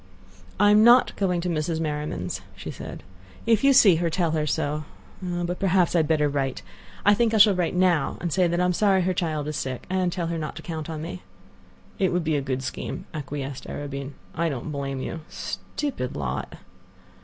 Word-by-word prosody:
"I'm 210 +1 +6
not 240 +2 +6
going 180 -3 0
to 180 - -3
Mrs. 160 0 -1
Merriman's," 150 - -3
she - - -7
said. - - -8 0.4
"If 225 0 +3
you 275 - +6
see 200 -10 +7
her, 170 0 0
tell 170 0 0
her 155 -1 0
so. 150 0 -1 0.4
But 175 -1 -2
perhaps 185 -2 +3
I - - +5
had 155 - +2
better 150 -2 +3
write. 135 -2 -2 0.4
I 205 - +7
think 225 +1 +2
I - - +4
shall 205 -1 +7
write 180 -1 -1
now, 180 -6 +2
and 170 -3 -2
say 185 -2 +3
that 170 +1 0
I 180 - +3
am 180 - +2
sorry 190 -1 +3
her 185 +1 +1
child 155 -4 -2
is 150 -1 -3
sick, 130 -1 -4
and 185 -1 +1
tell 175 -1 -2
her 165 0 -2
not 155 - -4
to - - -9
count 160 -2 -5
on 155 -1 -4
me." 175 +2 -6 0.8
"It 190 -2 +2
would 180 -1 0
be 155 -1 +1
a 145 - +1
good 130 -1 -3
scheme," - - -5
acquiesced 140 -2 -5
Arobin. 140 -1 -5 0.2
"I 170 0 0
don't 140 +1 -4
blame 135 -2 -3
you; 165 - -4
stupid 260 - -4
lot!" 65 -2 -3
165 Hz, 205 wpm, -25 LUFS, 145-185 Hz, 0.8 s, see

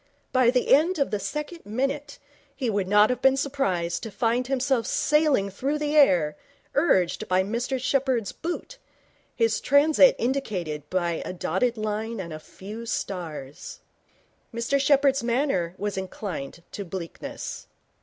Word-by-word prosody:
By 255 -2 +4
the 250 0 +3
end 330 +6 +4
of 280 -4 0
the 210 - -1
second 300 - -5
minute 275 +6 -3 0.4
he 255 -5 -1
would 200 -2 -1
not 210 +3 +5
have 250 - -3
been 265 0 +4
surprised 190 -12 -1
to 225 - -5
find 240 +3 0
himself 260 -3 0
sailing 295 -12 +2
through 275 +9 -1
the 300 0 -1
air, 175 - +5 0.4
urged 190 - +2
by 185 +1 +3
Mr 240 +6 -2
Sheppherd's 255 -4 0
boot, 350 +9 -6 0.6
his 225 -2 +1
transit 285 0 +5
indicated 180 - -2
by 175 -3 -1
a - - -5
dotted 205 +7 0
line 215 +1 -3
and 170 -4 -5
a 155 - -6
few 210 +8 -9
stars. 165 - -5 0.7
Mr 235 +4 0
Sheppherd's 275 -1 +4
manner 235 - 0
was 205 -1 -2
inclined 180 -5 -6
to 200 - -5
bleakness. 175 -2 -7
235 Hz, 145 wpm, -25 LUFS, 190-275 Hz, 0.7 s, not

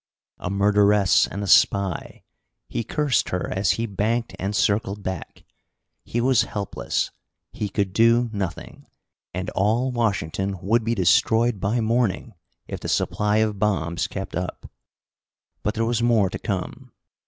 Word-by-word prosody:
A - - -4
murderess 100 0 +4
and 100 +1 -5
a - - -4
spy! 95 -2 +2 0.4
He 115 - -3
cursed 145 +3 0
her 90 - -3
as 95 +2 +2
he 115 - -1
banked 115 +3 -1
and 100 +2 -2
circled 100 0 0
back. 95 -4 -6 0.6
He 120 - -3
was 125 0 +4
helpless. 100 -2 -2 0.4
He 105 - -3
could 95 -1 -1
do 115 +2 +4
nothing. 95 -4 -5 0.4
And 95 +4 -4
all 115 +6 +1
Washington 100 -5 -1
would 110 +6 +1
be 115 +1 0
destroyed 110 +4 +3
by 110 +6 0
morning, 115 0 0 0.3
if - - -5
the - - -5
supply 105 0 +1
of 105 -2 -4
bombs 85 -5 0
kept 95 -1 -6
up. 90 0 -5 0.9
But 105 - -2
there 115 +1 0
was 120 0 0
more 115 -5 +3
to - - -5
come. - - -5
105 Hz, 145 wpm, -23 LUFS, 95-115 Hz, 0.9 s, murderess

